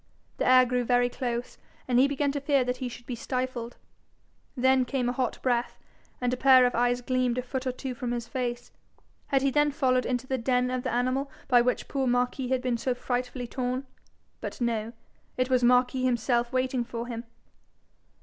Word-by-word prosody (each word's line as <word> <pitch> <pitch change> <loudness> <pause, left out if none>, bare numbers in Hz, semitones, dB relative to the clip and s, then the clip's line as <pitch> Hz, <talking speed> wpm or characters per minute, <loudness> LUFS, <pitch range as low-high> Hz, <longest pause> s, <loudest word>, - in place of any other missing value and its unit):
The - - 0
air 255 0 +7
grew 250 0 0
very 245 0 +2
close, 245 -1 -4 0.3
and 245 -1 +3
he 270 - +6
began 280 0 0
to 285 0 -3
fear 280 -2 +2
he 250 0 -2
should 240 0 -11
be 250 - -5
stifled. 250 0 -4 0.8
Then 260 +1 +4
came 250 0 -1
a - - +1
hot 255 -1 -2
breath, 245 -2 0 0.4
and 250 0 0
a - - -1
pair 260 -1 +7
of 245 - +1
eyes 245 +1 +1
gleamed 255 -1 0
a 250 - -1
foot 260 +1 -4
or - - +1
two 255 +1 -5
from 250 -1 -4
his 240 -1 -3
face. 240 -1 -4 0.6
Had 270 -1 +1
he 275 - +2
then 295 +2 +3
followed 260 -4 +1
into 250 0 -1
the 260 0 -2
den 250 +1 +1
of 255 0 -1
the - - -3
animal 255 +3 0 0.2
by 245 -2 +5
which 250 +1 0
poor 270 -2 -1
Marquis 245 +1 0
had 260 0 0
been 250 -2 0
so 250 +2 -1
frightfully 250 0 -3
torn? 255 +2 -3 0.5
But - - -6
no: 230 -2 -1 0.4
it 255 +1 0
was 250 -1 +3
Marquis 250 +1 +3
himself 240 -1 +1
waiting 255 -1 0
for 235 0 -5
him! 235 -1 -5
250 Hz, 200 wpm, -27 LUFS, 245-260 Hz, 0.8 s, air